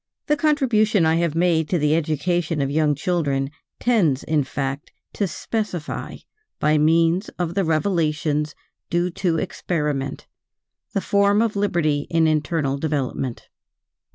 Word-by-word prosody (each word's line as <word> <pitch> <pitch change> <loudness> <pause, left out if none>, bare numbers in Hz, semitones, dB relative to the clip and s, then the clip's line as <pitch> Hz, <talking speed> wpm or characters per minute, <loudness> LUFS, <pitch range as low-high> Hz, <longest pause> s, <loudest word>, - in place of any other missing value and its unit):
The 295 - +2
contribution 235 - +2
I 160 +1 +3
have 170 -2 0
made 165 -2 +2
to 180 - +2
the 150 0 +2
education 165 +1 0
of 135 0 0
young 150 0 +2
children 140 -4 -1 0.3
tends, 180 - +2
in 155 -2 +1
fact, 135 +1 -4 0.2
to 200 - 0
specify 185 -5 -4 0.4
by 150 0 +3
means 165 +5 +3
of 175 -2 -2
the 195 +1 +1
revelations 155 -3 0 0.3
due 175 +1 0
to 170 -2 0
experiment, 150 -5 -2 0.7
the 195 - 0
form 200 +1 +3
of 225 -2 +1
liberty 165 -8 0
in 165 -1 +3
internal 150 -2 0
development. 135 -5 -2
160 Hz, 130 wpm, -22 LUFS, 150-180 Hz, 0.7 s, I